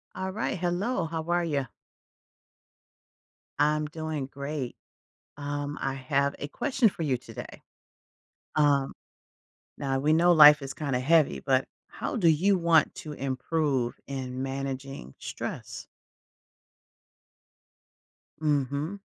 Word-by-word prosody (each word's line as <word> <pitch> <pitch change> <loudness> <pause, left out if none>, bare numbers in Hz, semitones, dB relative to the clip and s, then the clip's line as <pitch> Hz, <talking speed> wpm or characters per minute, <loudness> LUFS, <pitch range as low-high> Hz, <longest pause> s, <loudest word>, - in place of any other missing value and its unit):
All 190 0 -3
right, 210 0 -2
hello. 180 +3 0
How 160 0 -3
are 175 0 +2
you? 140 -5 -1 1.9
I'm 150 +1 +3
doing 155 -3 -4
great. 140 -1 -5 0.6
Um, 145 0 -4
I 135 - -1
have 140 +1 0
a 145 - -4
question 255 - +2
for 170 - -5
you 135 -5 +1
today. - - -10 1.0
Um, 145 -2 +3 0.9
now, 135 -1 -1
we 150 +3 +2
know 170 +2 +5
life 150 -2 +9
is 135 0 -5
kinda 140 -4 -1
heavy, 155 +3 +3
but 135 -1 +2 0.2
how - - -4
do 185 -7 +4
you 185 +6 +4
want 170 -3 +3
to 155 - -7
improve 135 -1 -1
in 130 -2 -4
managing 135 - -5
stress? - - -6 2.6
Mhm. 145 +5 0
145 Hz, 115 wpm, -28 LUFS, 135-165 Hz, 2.6 s, life